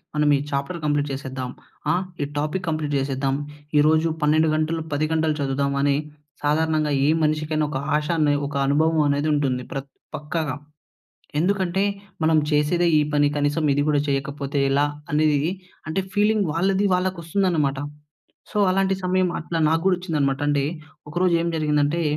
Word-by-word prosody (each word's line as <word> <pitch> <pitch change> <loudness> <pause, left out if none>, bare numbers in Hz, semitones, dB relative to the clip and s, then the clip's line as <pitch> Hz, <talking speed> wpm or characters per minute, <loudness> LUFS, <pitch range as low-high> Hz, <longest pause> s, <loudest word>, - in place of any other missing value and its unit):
మనం 150 0 +2
ఈ - - -2
chapter 140 +5 -2
complete 145 -1 0
చేసేద్దాం. 130 -2 -5 0.4
ఆహ్, 180 +2 +1 0.2
ఈ - - 0
టాపిక్ 155 +6 -2
కంప్లీట్ 155 -2 -1
చేసేద్దాం. 135 0 -1 0.4
ఈరోజు 155 +2 +4
12 155 +1 +3
గంటలు, 160 +1 0
10 145 +2 +1
గంటలు 160 -1 +1
చదువుదామని 140 0 +1 0.5
సాధారణంగా 155 0 +1 0.2
ఏ - - +4
మనిషికైనా 155 0 0
ఒక 145 - -3 0.2
ఆశ 150 0 0
అనె 150 -1 +3
ఒక 145 - -7
అనుభవమనేది 150 0 +2
ఉంటుంది 135 -4 0
ప్రత్ 135 -1 -5 0.2
పక్కాగా. 150 -2 -3 0.9
ఎందుకంటే, 190 +1 +1 0.4
మనం 160 0 +4
చేసేదే 155 +4 +2
ఈ - - +3
పని, 145 0 +3
కనీసం 145 +2 0
ఇది 145 +1 +1
గూడా 145 -1 +3
చెయ్యకపోతే 140 +1 -2
ఎలా 140 +2 +3 0.3
అనేదీ 150 -1 +3 0.5
అంటే, 160 +5 0
ఫీలింగ్ 210 -1 +2
వాళ్ళది 190 +4 +1
వాళ్ళకొస్తుందనమాట. 170 -5 0 0.7
సో, - - -1
అలాంటి 195 +1 +2
సమయం 185 0 +2
అట్లా 165 +1 -3
నాకు 165 +1 +1
గూడొచ్చిందనమాట. 160 -7 +1
అంటే, 145 -1 +2 0.5
ఒకరోజు 175 +2 +2
ఏం 170 - -1
జరిగిందంటే, 150 +1 +1
150 Hz, 140 wpm, -23 LUFS, 145-165 Hz, 0.9 s, ఈరోజు